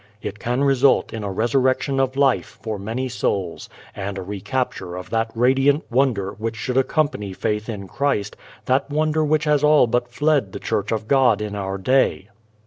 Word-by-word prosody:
It 105 0 -6
can 125 +4 -1
result 135 -1 +3
in 110 -2 -5
a 100 - -3
resurrection 130 +5 +1
of 135 0 0
life 140 -2 +1
for 110 -3 -3
many 115 +6 -3
souls 100 -7 -2 0.3
and 100 0 -4
a 95 - -4
recapture 100 -1 -3
of 90 0 -8
that 115 0 0
radiant 135 +5 +3
wonder 120 -7 +1
which 110 +3 -4
should 125 +3 -3
accompany 135 -7 0
faith 105 +3 -2
in 100 -3 -5
Christ, 115 -2 -1 0.3
that 135 +2 +1
wonder 155 +1 +1
which 155 0 +1
has 150 -1 +2
all 150 -2 +6
but 120 +1 0
fled 130 -4 0
the - - -5
Church 105 -2 -2
of 110 -1 -2
God 130 -5 +4
in 105 -1 -4
our 95 -1 -3
day. 105 -2 +1
120 Hz, 180 wpm, -22 LUFS, 105-135 Hz, 0.3 s, all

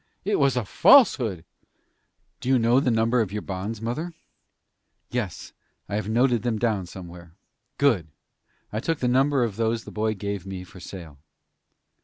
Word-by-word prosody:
"It 205 +1 +1
was 140 -3 +3
a 120 - 0
falsehood." 115 - +5 0.9
"Do 125 - -4
you 130 - +5
know 120 +2 +4
the 135 - +1
number 115 +1 +2
of 105 -4 -2
your 105 0 -4
bonds, 100 +4 -4
mother?" 155 +10 -3 1.0
"Yes, 115 -7 -4 0.3
I - - -7
have 105 +1 -1
them 110 - -3
noted 120 -1 +3 0.2
down, 105 -6 0
somewhere." 85 -2 -11 0.4
"Good! 115 - +2 0.7
I 110 - -1
took 165 +7 -1
the 125 - -1
number 135 +1 +3
of 110 -4 -3
those 115 0 0
the - - -10
boy 110 0 -1
gave 100 -1 -4
me 95 -1 -6
for 90 +1 -14
sale." 85 -6 -10
110 Hz, 165 wpm, -25 LUFS, 95-125 Hz, 1.0 s, falsehood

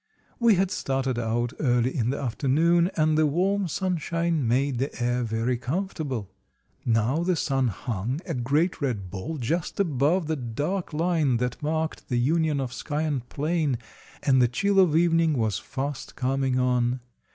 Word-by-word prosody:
We 235 -3 +5
had 190 +1 +1
started 135 -5 -1
out 120 +2 -1
early 125 -2 +1
in 120 -4 +1
the 140 - -1
afternoon, 155 +7 +2
and 155 0 +3
the 155 0 +4
warm 190 +6 +1
sunshine 170 -4 -1
made 130 +2 +1
the 135 0 -3
air 120 0 0
very 115 +2 0
comfortable. 135 - -3 0.5
Now 115 +5 +2
the 180 +1 +1
sun 135 -4 +1
hung, 115 - -3
a - - -3
great 145 +9 0
red 105 -10 -2
ball, 100 +12 -4
just 155 - -2
above 160 0 +2
the 160 +1 -1
dark 145 - -3
line 160 -5 +1
that 125 +1 -2
marked 160 +1 -2
the 125 - +1
union 155 +3 +2
of 130 -2 -3
sky 150 +4 -3
and 140 -6 -2
plain, 150 -3 0 0.5
and 130 -2 +4
the 120 - +5
chill 200 +11 +1
of 175 -5 +4
evening 165 -1 +3
was 110 -3 0
fast 140 +1 -5
coming 135 0 0
on. 125 0 +1
140 Hz, 165 wpm, -26 LUFS, 125-165 Hz, 0.5 s, We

